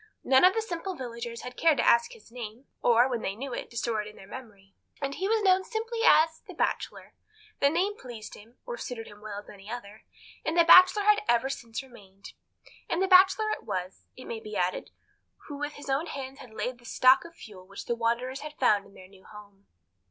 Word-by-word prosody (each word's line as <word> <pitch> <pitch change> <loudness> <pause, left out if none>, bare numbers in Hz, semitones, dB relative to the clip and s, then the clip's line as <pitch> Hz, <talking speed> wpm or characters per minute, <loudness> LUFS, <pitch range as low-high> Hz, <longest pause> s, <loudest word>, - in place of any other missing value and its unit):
None 265 +3 +4
of 370 +3 +6
the 445 - 0
simple 370 -1 -5
villagers 235 -3 -6
had 250 0 -8
cared 320 -3 +3
to - - +1
ask 235 - +4
his 460 - -17
name, 235 +1 -8 0.2
or, 240 +1 +5
when 245 -3 -3
they 195 - -3
knew 260 +3 -6
it, - - -5
to 235 - -10
store 225 -2 -1
it 210 - -8
in 210 - -11
their - - -13
memory, 200 -4 -12 0.3
and 275 -1 -3
he 380 +6 -2
was 440 0 +1
known 375 -1 +4
simply 455 +2 -4
as 320 -6 +5
the - - -10
Bachelor. - - -3 0.5
The 280 - +4
name 370 +7 0
pleased 235 -4 -9
him, 225 +4 -15
or - - -5
suited 235 -3 -6
him 205 - -13
as - - -20
well 210 -1 -7
as - - -26
any 200 0 -13
other, 220 -3 -8 0.4
and 320 +2 -2
the 340 - +7
Bachelor 370 +4 +8
he 415 - +2
had 420 0 +5
ever 240 +3 +2
since 230 -1 -6
remained. 200 -7 -15 0.6
And 335 - 0
the 385 - +2
Bachelor 380 +3 +5
it - - -3
was, 185 -3 -5
it 255 - -10
may 225 - -5
be 215 -1 -9
added, 180 0 -1 0.6
who 290 - -7
with 290 +1 -3
his 290 - -11
own 275 +5 0
hands 270 0 -7
had 245 - -12
laid 235 +3 -3
in 250 - -19
the 240 - -21
stock 255 +3 +5
of 335 0 -13
fuel 190 - -13
which 200 0 -9
the - - -1
wanderers 235 +3 -1
had 300 0 -9
found 205 -6 +2
in 200 - -20
their 185 - -13
new 190 0 -20
home. 205 -2 -15
250 Hz, 240 wpm, -28 LUFS, 215-330 Hz, 0.6 s, Bachelor